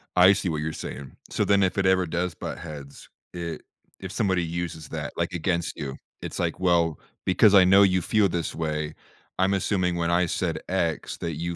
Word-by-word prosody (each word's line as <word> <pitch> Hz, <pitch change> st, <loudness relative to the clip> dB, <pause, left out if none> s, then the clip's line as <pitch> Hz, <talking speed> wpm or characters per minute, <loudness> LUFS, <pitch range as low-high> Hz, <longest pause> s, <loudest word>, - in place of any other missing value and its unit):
I 90 Hz, +2 st, +7 dB
see 95 Hz, -2 st, -1 dB
what 75 Hz, -2 st, -2 dB
you're 80 Hz, +1 st, -3 dB
saying, 65 Hz, +1 st, -7 dB
so -, -, 0 dB
then 100 Hz, -1 st, +4 dB
if 95 Hz, -, 0 dB
it 100 Hz, -, +1 dB
ever 95 Hz, -1 st, +4 dB
does 85 Hz, +1 st, -2 dB
butt -, -, -6 dB
heads, 75 Hz, -4 st, -10 dB, 0.2 s
it 85 Hz, -3 st, -5 dB, 0.4 s
if -, -, -7 dB
somebody 95 Hz, -3 st, +1 dB
uses 85 Hz, -2 st, -4 dB
that, -, -, -5 dB
like -, -, -1 dB
against 85 Hz, +1 st, -1 dB
you, 70 Hz, -4 st, -5 dB, 0.3 s
it's -, -, -6 dB
like, -, -, -1 dB
"Well, 85 Hz, -4 st, +2 dB, 0.3 s
because 100 Hz, +3 st, +5 dB
I 95 Hz, -, +9 dB
know 95 Hz, +2 st, +6 dB
you 95 Hz, -2 st, +3 dB
feel 105 Hz, +3 st, +2 dB
this 85 Hz, -2 st, -3 dB
way. 75 Hz, -1 st, -2 dB, 0.5 s
I'm 95 Hz, +1 st, +3 dB
assuming 95 Hz, -2 st, 0 dB
when 85 Hz, -1 st, 0 dB
I 90 Hz, +1 st, +3 dB
said 80 Hz, -1 st, -2 dB
X 85 Hz, -4 st, -1 dB
that 85 Hz, -2 st, -4 dB
you 85 Hz, +3 st, -3 dB
85 Hz, 205 wpm, -25 LUFS, 80-95 Hz, 0.5 s, I